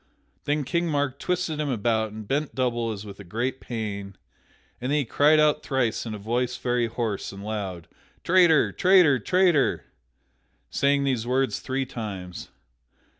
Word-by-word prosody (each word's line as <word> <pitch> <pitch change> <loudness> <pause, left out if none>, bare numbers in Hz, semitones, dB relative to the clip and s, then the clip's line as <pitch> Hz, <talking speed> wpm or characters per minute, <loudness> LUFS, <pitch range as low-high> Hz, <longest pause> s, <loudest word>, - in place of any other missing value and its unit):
Then 145 0 0
King 170 +5 -1
Mark 145 -3 -1
twisted 180 -4 -1
him 150 -1 -1
about 110 -2 0
and 110 -1 -9
bent 145 +4 -1
double 120 -3 0
as 105 -1 -7
with 100 -1 -10
a - - -8
great 120 +8 -3
pain, 100 -4 -5 0.7
and 125 +2 -2
then 150 - +3
he 145 - 0
cried 150 +6 +4
out 150 0 +3
thrice 125 -4 -1
in 110 - -4
a - - -6
voice 120 +4 -1
very 120 -1 0
hoarse 115 -3 -3
and 100 0 -9
loud: 100 -5 -5 0.4
"Traitor! 175 -3 +5
Traitor! 180 -8 +5
Traitor!" 165 - +2 0.9
Saying 140 0 +2
those 125 -4 -1
words 130 +1 +1
three 135 +1 -2
times. 100 -7 -7
125 Hz, 160 wpm, -25 LUFS, 110-145 Hz, 0.9 s, Traitor